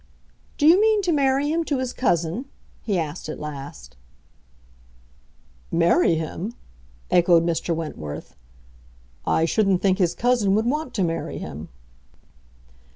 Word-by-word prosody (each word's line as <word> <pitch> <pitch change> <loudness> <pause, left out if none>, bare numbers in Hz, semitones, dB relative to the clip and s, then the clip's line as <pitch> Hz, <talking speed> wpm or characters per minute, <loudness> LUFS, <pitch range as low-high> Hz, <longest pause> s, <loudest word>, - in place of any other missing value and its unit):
"Do 290 - +1
you 345 +6 +7
mean 435 -1 +3
to 360 - +1
marry 280 -1 +2
him 335 +1 +1
to 285 - -1
his 255 -1 -3
cousin?" 175 - 0 0.4
he 205 -4 -1
asked 160 -1 -4
at - - -6
last. 135 - -8 1.7
"Marry 170 0 +3
him?" 170 +8 -4 0.6
echoed 170 -1 +5
Mr. 170 0 -1
Wentworth. 75 - -6 0.9
"I 160 - +2
shouldn't 195 0 +1
think 190 0 +2
his 175 -3 +1
cousin 235 -5 +2
would 220 +2 +1
want 295 +2 -2
to 195 - +1
marry 165 -1 -3
him." 75 +4 -7
185 Hz, 130 wpm, -23 LUFS, 165-255 Hz, 1.7 s, you